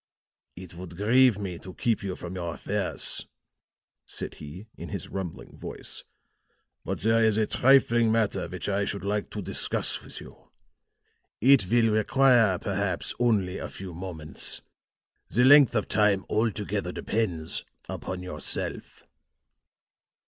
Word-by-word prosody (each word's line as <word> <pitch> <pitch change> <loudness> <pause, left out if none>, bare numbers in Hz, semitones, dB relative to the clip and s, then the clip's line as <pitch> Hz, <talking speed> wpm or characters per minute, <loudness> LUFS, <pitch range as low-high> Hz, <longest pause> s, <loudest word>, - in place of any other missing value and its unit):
"It 90 -1 -10
would 85 -1 -9
grieve 120 +2 +4
me 95 -4 -5
to 95 - -10
keep 115 -3 0
you 95 -2 -4
from 85 +1 -7
your 85 -3 -4
affairs," - - -1 0.8
said - - -4
he 80 +8 -10
in - - -8
his - - -5
rumbling 95 -4 -6
voice, - - -6 0.8
"but - - -4
there 115 +2 +3
is 110 -1 +3
a 110 - +3
trifling 120 -2 +4
matter 110 -2 +1
which - - -6
I 100 0 +1
should 100 -1 -3
like 105 +1 -1
to 105 - -5
discuss - - 0
with - - -9
you. - - -14 0.9
It 130 -5 +5
will 115 -1 +4
require, 115 -2 +4
perhaps, 100 -2 -2
only 105 -7 +1
a - - -5
few 95 -2 -8
moments. 85 -3 -5 0.7
The 120 - +3
length 140 -1 +7
of 105 - 0
time 105 -2 +2
altogether 110 -2 -1
depends 90 -8 -1 0.2
upon 90 0 -5
yourself." 90 - -4
100 Hz, 135 wpm, -27 LUFS, 90-115 Hz, 0.9 s, length